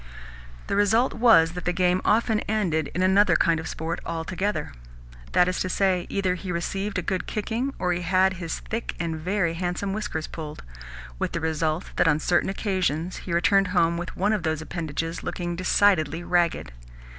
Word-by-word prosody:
The - - -2
result 215 +5 +3
was 225 -9 +5
that 180 0 -7
the 175 - +2
game 180 0 +2
often 220 0 +2
ended 175 -9 0
in 180 - +1
another 195 +2 +4
kind 165 -2 +3
of 160 - -6
sport 165 +2 -4
altogether. 170 +1 -3 0.6
That 180 - +5
is 185 - -1
to 185 - -1
say, 185 -2 +1
either 195 -2 0
he 180 +1 -5
received 195 +4 -2
a 185 - -1
good 185 +1 -2
kicking, 230 +5 -2
or 180 -1 0
he 175 - -3
had 185 +2 +2
his 165 -1 -4
thick 230 +1 -4
and 165 -1 -2
very 175 +1 -1
handsome 180 +3 -2
whiskers 205 -7 -3
pulled; 155 -2 -8 0.6
with - - -2
the - - -1
result 160 +1 -1
that - - +4
on 150 -1 +3
certain 175 +3 +1
occasions 185 -4 -1
he 180 - -7
returned 195 +3 +3
home 170 0 +3
with 175 +1 -6
one 205 +3 +2
of 210 - 0
those 160 -2 -1
appendages 165 0 -4
looking 175 -1 -4
decidedly 175 -3 +2
ragged. 175 - +1
180 Hz, 180 wpm, -25 LUFS, 165-195 Hz, 0.6 s, was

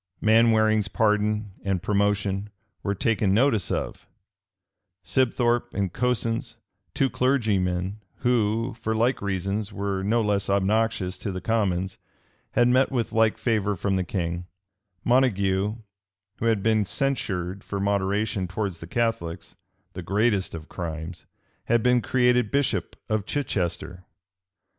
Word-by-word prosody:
Manwaring's 110 -1 +4
pardon 105 -1 +1
and 95 -2 -1
promotion 100 -1 0 0.3
were 100 - -1
taken 100 -2 +1
notice 115 -5 +2
of: - - -3 1.0
Sibthorpe 120 -1 +1
and 95 -3 -1
Cosins, 115 -2 -1 0.4
two 135 - +3
clergymen, 100 -8 0 0.2
who, 115 -1 +1
for 110 -1 -1
like 120 +3 +1
reasons, 100 +2 -2
were 100 -1 -2
no 110 +4 +1
less 100 -2 0
obnoxious 100 -1 +1
to 100 - -3
the 95 - -4
commons, 95 -3 -1 0.5
had 120 - +4
met 130 +2 +3
with 120 -4 -1
like 110 -1 +3
favor 105 -4 0
from 95 +2 -1
the 95 - +1
king: 85 -1 -3 0.6
Montague, 105 -5 +2 0.6
who - - -3
had 110 -4 +2
been 110 -1 +3
censured 100 -6 -2
for 100 - -4
moderation 100 0 0
towards 95 -2 -3
the 85 - -9
Catholics, 90 -6 -2 0.4
the 90 - -6
greatest 100 +1 +1
of 80 0 -8
crimes, 80 -1 -6 0.4
had 120 -1 +2
been 125 -1 +4
created 125 -3 +2
bishop 135 -9 0
of 110 -1 -1
Chichester. 90 - -2
105 Hz, 125 wpm, -25 LUFS, 95-115 Hz, 1.0 s, Manwaring's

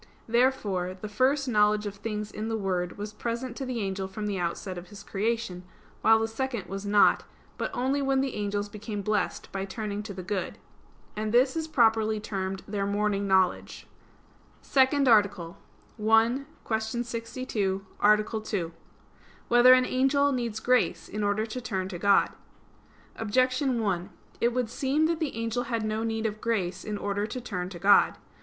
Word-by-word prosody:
Therefore 215 -7 +1
the 215 - -5
first 265 +6 +1
knowledge 210 -2 +3
of 205 - -3
things 210 0 -4
in 215 +1 -4
the 225 - -1
Word 180 -3 -2
was 210 +1 -6
present 235 +2 -4
to 270 - -4
the 245 -3 -2
angel 195 -1 -2
from 210 +2 -6
the 200 -2 -2
outset 180 +2 -3
of 175 0 -8
his 200 +1 -11
creation; 210 -3 -2 0.4
while 225 0 +6
the 225 0 0
second 235 -2 -3
was 195 +2 -6
not, 205 0 +5 0.4
but - - -1
only 265 +3 0
when 270 -1 +2
the 270 -1 -1
angels 205 0 -2
became 210 0 -6
blessed 210 +1 -1
by 195 0 -3
turning 205 +1 -4
to 210 0 -7
the 185 - -6
good. 190 +1 -3 0.6
And 215 0 -2
this 255 +4 +4
is 320 -1 -2
properly 220 -6 +3
termed 195 -2 -4
their 200 -1 -2
morning 200 0 0
knowledge. 190 -2 +1 0.8
_______________________ - - -22
SECOND 275 +1 +3
ARTICLE 200 -6 +3 0.5
[I, 225 +5 +4 0.2
Q. 220 +2 -1
62, 230 -4 -3
Art. 210 +1 +4 0.2
2] 175 -7 -2 0.8
Whether 240 +1 +8
an 255 0 +3
Angel 280 +3 +2
Needs 235 -4 -2
Grace 250 +2 +1
in 210 0 -3
Order 205 +2 +1
to 230 +3 -6
Turn 190 -6 -2
to 175 -3 -6
God? 200 +1 +4 0.9
Objection 255 +3 +1
1: 190 -4 -1 0.3
It 235 - +3
would 245 -2 -1
seem 280 +4 +1
that 330 0 0
the 310 -7 -2
angel 230 +2 -2
had 230 -2 -2
no 215 +1 -1
need 225 0 -2
of 215 -1 -3
grace 190 -6 -1
in 210 -1 -4
order 205 +1 -2
to 240 +4 -5
turn 185 -7 -4
to 185 - -8
God. 200 +4 +5
215 Hz, 175 wpm, -28 LUFS, 200-240 Hz, 0.9 s, Whether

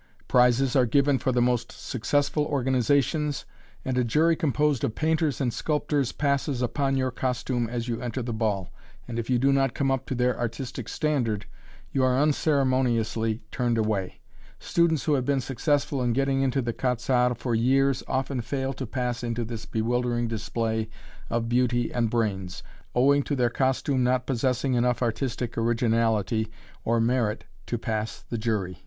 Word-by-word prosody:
Prizes 125 +2 +3
are 130 -3 +4
given 140 +1 +3
for 130 - 0
the 120 -1 +2
most 120 -1 0
successful 145 +4 0
organizations, 140 +2 +1 0.4
and 130 -1 0
a - - +3
jury 155 +8 +3
composed 150 -3 +1
of 110 - -1
painters 160 -2 +1
and 125 -4 0
sculptors 150 -3 0
passes 140 -2 0
upon 135 +2 0
your 130 -1 0
costume 125 -2 -1
as 120 0 -3
you 115 -2 -3
enter 125 +1 -3
the 120 0 -3
ball, 105 -4 -1 0.4
and 120 -1 -3
if 115 - -4
you 125 - +3
do 135 +3 +3
not 135 -3 +1
come 135 -1 +1
up 135 0 -1
to 130 - -2
their 125 0 +1
artistic 120 +2 -4
standard 120 -9 -1 0.5
you 135 - +1
are 130 0 +3
unceremoniously 130 -7 +1
turned 120 -2 0
away. 105 -4 -1 0.4
Students 165 -5 +1
who 155 - +1
have 135 -3 +2
been 140 +1 +1
successful 135 +2 0
in 120 -1 +1
getting 135 +1 +1
into 135 0 +1
the 120 0 -2
"Quat'z' 125 0 -1
Arts" 125 -1 +3
for 120 +1 -2
years 135 +3 +2
often 130 -1 -1
fail 135 +2 -2
to 130 -1 -5
pass 125 0 -2
into 120 0 -2
this 115 -1 -6
bewildering 120 +1 0
display 110 0 -2 0.4
of 115 0 -1
beauty 120 0 +1
and 120 -2 +1
brains, 95 -5 -2 0.3
owing 140 +3 +4
to 145 - -2
their 120 -3 +1
costume 130 +1 +1
not 125 0 +1
possessing 130 +1 0
enough 125 +1 +1
artistic 120 0 -2
originality 115 -2 +1 0.4
or 115 +1 +1
merit 115 -2 0 0.2
to 120 - -1
pass 110 -1 -3
the 120 - -3
jury. 105 -6 -2
125 Hz, 170 wpm, -26 LUFS, 115-135 Hz, 0.5 s, are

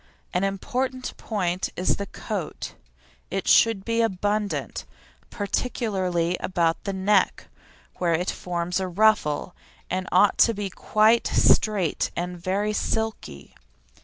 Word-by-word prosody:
An 180 +1 +1
important 255 +6 -2
point 185 -4 -2
is 180 - +1
the 200 - -4
coat. 200 -8 -5 0.6
It 195 0 -3
should 225 -4 +4
be 230 0 +1
abundant, 205 0 -1 0.5
particularly 190 -5 -1
about 170 -2 0
the 200 - -1
neck, 190 +1 +1 0.5
where 170 -2 +2
it 180 +3 -1
forms 180 +1 -2
a 190 - -2
ruffle, 185 -4 +2 0.4
and 185 +1 -2
it - - -9
ought 190 +2 +4
to 230 - +5
be 200 -1 -4
quite 215 +4 +3
straight 200 -7 +2
and 180 +1 -3
very 200 +3 0
silky. 220 - -3
195 Hz, 125 wpm, -25 LUFS, 180-215 Hz, 0.6 s, to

